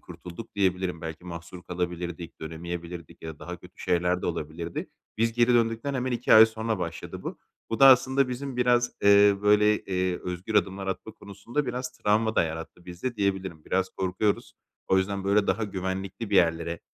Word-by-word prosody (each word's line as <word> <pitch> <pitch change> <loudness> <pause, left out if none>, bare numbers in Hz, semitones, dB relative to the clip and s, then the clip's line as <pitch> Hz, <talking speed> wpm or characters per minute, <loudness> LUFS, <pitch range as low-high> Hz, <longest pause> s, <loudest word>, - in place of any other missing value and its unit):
kurtulduk 90 +5 -10
diyebilirim. 95 -3 0
Belki 80 +1 -7
mahsur 85 +1 -8
kalabilirdik, 90 -1 -5
dönemeyebilirdik 85 +1 -7
ya 80 -1 -6
da - - -26
daha - - -7
kötü - - -17
şeyler 90 +1 +1
de - - -1
olabilirdi. 85 0 -4 0.3
Biz 115 0 +2
geri 120 +1 +3
döndükten 115 +4 +1
hemen 130 -1 -1
2 120 +1 +1
ay 110 +1 +10
sonra 110 -2 -3
başladı 85 -2 -5
bu. - - -6 0.3
Bu 115 - -2
da 135 - +10
aslında 130 +1 +5
bizim 130 +1 -5
biraz, 120 0 +3
eee, 100 0 +7
böyle, 105 +1 +4
eee, 90 -1 -1
özgür 90 +4 -5
adımlar 95 -1 +1
atma 95 +3 -4
konusunda 110 +8 -4
biraz 125 0 -3
travma 110 +1 +1
da - - +4
yarattı 80 +2 -6
bizde 90 +8 -5
diyebilirim. 95 -5 -2
Biraz 95 0 0
korkuyoruz. 95 +2 -1 0.3
O 95 - +4
yüzden 95 +1 -2
böyle 100 +1 +3
daha 110 0 +1
güvenlikli 95 +2 -4
bir 100 - +3
yerlere, 85 -1 +2
95 Hz, 175 wpm, -27 LUFS, 90-110 Hz, 0.3 s, ay